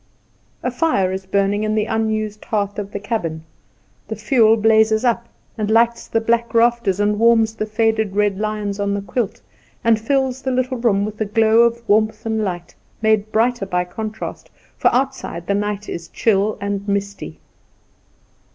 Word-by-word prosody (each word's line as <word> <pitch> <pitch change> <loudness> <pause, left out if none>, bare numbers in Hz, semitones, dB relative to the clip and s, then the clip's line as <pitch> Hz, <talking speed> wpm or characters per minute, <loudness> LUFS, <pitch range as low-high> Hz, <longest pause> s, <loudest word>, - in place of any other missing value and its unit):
A 250 - -1
fire 245 - +1
is 190 0 -5
burning 200 +2 +1
in 215 0 0
the 215 -1 +1
unused 215 -1 -2
hearth 205 -1 -2
of 200 -1 -6
the 200 - -4
cabin. 170 -7 -3 0.6
The - - -4
fuel 225 -5 +3
blazes 220 +1 +3
up, 235 -1 +1 0.3
and 210 -1 -1
lights 235 +1 +2
the 225 - +1
black 235 +1 0
rafters, 230 -4 +2
and 210 0 +1
warms 225 -1 +4
the 215 -1 -4
faded 220 -2 0
red 205 -1 +1
lions 210 -1 -3
on 200 0 0
the 200 - -4
quilt, 205 +3 -3 0.4
and 230 -1 +3
fills 265 +2 0
the 265 - -2
little 255 0 -1
room 205 -4 +2
with 215 0 -7
a - - +2
glow 220 +2 +3
of 235 0 +2
warmth 215 +1 +1
and 220 -1 -1
light 175 -3 -4 0.3
made 220 -1 +1
brighter 230 -2 +1
by 180 -1 0
contrast, 215 +4 -6 0.3
for - - +1
outside 255 -10 -2
the 200 - 0
night 205 0 -2
is 170 -1 -6
chill 210 -1 +1
and 200 0 -3
misty. 200 0 -3
215 Hz, 170 wpm, -20 LUFS, 200-230 Hz, 0.6 s, warms